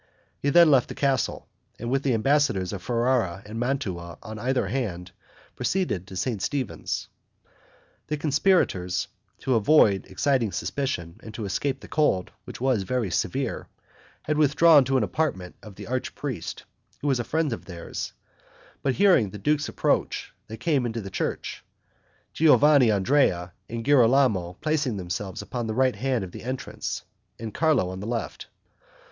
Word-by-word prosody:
He 140 - 0
then 170 +1 +7
left 130 -3 +4
the - - -6
castle, 135 -3 0 0.3
and, 120 +1 -4
with 135 0 +2
the 135 -4 +1
ambassadors 110 -7 +2
of 100 - -5
Ferrara 115 -5 0
and 110 +2 -6
Mantua 95 -10 -3
on 110 0 -7
either 130 +3 0
hand, 90 -9 -3 0.4
proceeded 170 - -1
to 95 - -9
St. 105 +1 -2
Stephen's. 135 -2 -3 1.0
The 150 - -2
conspirators, 140 - +1 0.3
to 130 - +1
avoid 110 -4 +4
exciting 130 -7 +1
suspicion, 85 -12 -3
and 110 - -10
to 110 - -4
escape 135 +8 -2
the - - -11
cold, 150 - +1
which - - -9
was 130 -4 +2
very 110 0 -1
severe, - - -2 0.6
had 155 0 0
withdrawn 155 0 +6
to 135 +1 +2
an 125 - +2
apartment 95 - -2
of 105 -3 -12
the - - -9
archpriest, 130 +1 -4 0.4
who 145 - -2
was 135 -3 +2
a - - 0
friend 155 +2 0
of - - -7
theirs, 85 -3 -6 0.7
but 135 -2 0
hearing 185 - +4
the 105 - -8
duke's 145 +7 0
approach, - - -1
they 110 - -7
came 140 -5 +1
into 115 0 -4
the 95 -1 -8
church, - - -3 0.7
Giovanandrea 130 - +4 0.2
and 115 0 -5
Girolamo 125 -9 +4
placing 145 -7 0
themselves 95 +1 -4
upon 120 -2 -4
the 110 - -3
right 130 -2 +2
hand 125 0 -1
of 90 - -7
the - - -9
entrance, 130 +2 -4 0.3
and 110 -2 -6
Carlo 150 - +2
on 95 - -6
the 100 - -6
left. 115 -2 -4
120 Hz, 155 wpm, -25 LUFS, 100-140 Hz, 1.0 s, then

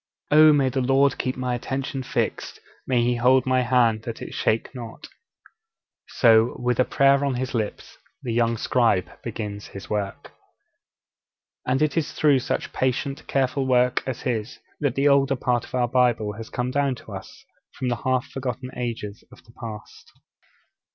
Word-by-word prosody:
'Oh, 155 +1 +8
may 140 -3 +3
the 130 +1 -1
Lord 135 +2 +3
keep 130 0 -2
my 125 -1 -2
attention 135 +3 -3
fixed, 125 - -3 0.3
may 125 -2 +2
He 120 0 +1
hold 125 +2 +4
my 130 -1 +2
hand 120 -3 +2
that 115 0 -6
it - - -8
shake 110 +4 0
not!' 120 -3 -9 1.0
So, 115 -1 +4
with 125 -1 0
a 130 - +5
prayer 140 0 +3
on 140 -2 0
his 130 +1 -3
lips, 110 -4 -4 0.2
the 120 - -2
young 115 0 +1
scribe 115 -6 +1
begins 105 -3 -6
his 100 - -10
work. 100 -2 -3 1.4
And 130 +4 +2
it 155 +1 0
is 160 - -1
through 145 -4 +3
such 125 - -3
patient, 135 +2 -2
careful 135 0 0
work 125 0 +3
as 130 -2 -4
his 115 -2 -3 0.2
that 140 -4 0
the 140 +1 +2
older 140 -1 +4
part 125 -1 0
of - - -8
our 125 -1 +2
Bible 120 -4 +2
has 110 +2 -9
come 125 +1 -2
down 140 -1 +1
to - - -13
us - - -10 0.3
from 125 - -2
the 120 - -1
half 130 +1 0
forgotten 130 -1 -4
ages 115 -4 -5
of - - -16
the 115 - -19
past. 110 -3 -9
125 Hz, 170 wpm, -24 LUFS, 115-135 Hz, 1.4 s, Oh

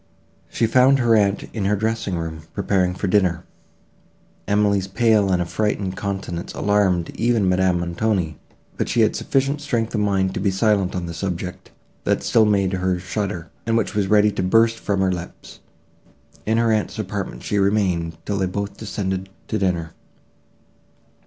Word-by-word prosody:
She 115 - 0
found 130 +4 +5
her 120 -3 +3
aunt 100 -2 +2
in 105 -4 -2
her 105 +2 +2
dressing 110 -2 -1
room, 80 -1 -5
preparing 90 -2 +1
for 95 - -3
dinner. 90 -3 +1 1.0
Emily's 100 -1 +2
pale 105 -1 +3
and 90 - +2
affrighted 95 +1 -1
countenance 95 -4 -4
alarmed 95 -4 +1
even 115 -4 +1
Madame 90 -1 +2
Montoni; 85 -2 -1 0.4
but - - -1
she - - +2
had - - +3
sufficient 140 +2 0
strength 120 -6 -1
of 105 - 0
mind 95 -2 +1
to - - -3
be 100 +1 +1
silent 95 -1 +1
on 90 -1 -2
the 85 - -6
subject, 90 +1 -5 0.3
that - - 0
still 110 - +4
made 100 -2 +2
her 95 -1 0
shudder, 95 -1 -4 0.2
and 115 0 +2
which 115 - -1
was 105 -2 0
ready 105 +1 +4
to 100 - -3
burst 115 +4 +3
from 100 -2 -1
her 95 -1 +2
lips. 90 -1 -8 0.9
In 110 +1 +2
her 115 -1 +3
aunt's 110 -1 -1
apartment 100 -2 -4
she 105 - 0
remained 95 -5 +1
till 100 -1 -2
they 95 - +1
both 100 +2 -4
descended 95 -3 -3 0.2
to 110 - -1
dinner. 85 -4 -1
100 Hz, 165 wpm, -22 LUFS, 90-110 Hz, 1.0 s, found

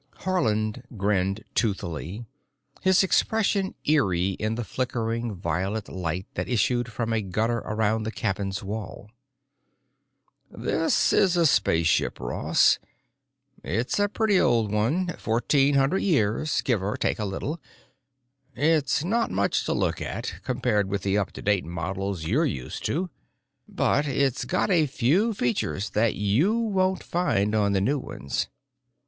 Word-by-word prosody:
Haarland 110 - 0 0.2
grinned 100 +1 0
toothily, 100 -1 -2 0.6
his 190 0 +4
expression 200 0 +1
eerie 95 - +2
in 110 +3 -2
the 120 - -3
flickering 115 -2 -2
violet 95 +5 -2
light 90 0 -3
that - - -3
issued 120 0 +1
from 115 -1 -2
a 110 - +1
gutter 110 +5 -1
around 110 0 0
the 110 +1 -3
cabin's 100 -2 -2
wall. 105 0 -6 1.4
"This 160 - +1
is 185 -3 +3
a 170 - +4
spaceship, 85 - +2
Ross. - - +2 0.8
It's 125 - -1
a 205 0 +2
pretty 210 -2 +2
old 115 -4 +2
one—fourteen 135 +1 +1
hundred 140 +8 +2
years, 150 - +1
give 120 -8 0
or 100 +2 -2
take - - -1
a - - -1
little. 145 - -4 0.9
It's 150 +2 +2
not 230 +7 +1
much 100 +1 0
to - - 0
look - - -1
at, - - -4
compared 105 -5 0
with 100 -1 -2
the 100 +1 +1
up 100 - -2
to - - -9
date 100 -3 +2
models 90 +1 -4
you're 125 - +2
used 95 - -3
to, 175 +3 -1 0.6
but 145 +2 +1
it's 140 -1 0
got 185 +2 0
a 165 -4 +4
few 170 - +1
features 105 - -1
that 110 +1 +2
you 125 - +2
won't 190 -5 0
find 105 - 0
on 105 -2 +2
the 95 - +2
new 140 +8 +1
ones. 70 - -4
115 Hz, 140 wpm, -26 LUFS, 100-150 Hz, 1.4 s, his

